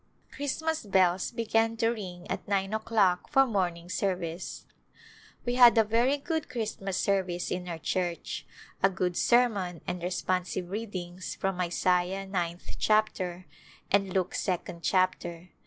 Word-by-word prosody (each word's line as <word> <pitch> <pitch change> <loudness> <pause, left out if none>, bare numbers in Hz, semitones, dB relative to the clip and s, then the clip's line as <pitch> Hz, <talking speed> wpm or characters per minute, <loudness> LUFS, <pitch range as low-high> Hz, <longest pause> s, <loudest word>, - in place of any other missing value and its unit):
Christmas 315 +3 -2
bells 190 -3 +3
began 225 -1 +1
to 225 0 +2
ring 185 -6 -5
at - - -4
nine 195 0 0
o'clock 215 -5 +2
for 270 -2 +5
morning 180 -7 -1
service. 180 -2 -3 0.8
We 245 - 0
had 245 -2 +8
a 225 - +7
very 235 +6 +2
good 315 +1 -3
Christmas 210 -6 -3
service 185 -3 0
in 180 0 -3
our 170 - -3
church, 175 +1 -3 0.3
a 195 - +5
good 180 -2 -1
sermon 205 -9 +2
and 180 0 -3
responsive 180 0 -2
readings 185 -4 -5
from 190 -1 -1
Isaiah 180 +2 +1
ninth 175 -3 -3
chapter 185 -4 +1 0.5
and 195 -1 +3
Luke 185 -1 0
second 175 -2 -2
chapter. 180 -1 0
190 Hz, 135 wpm, -29 LUFS, 180-220 Hz, 0.8 s, had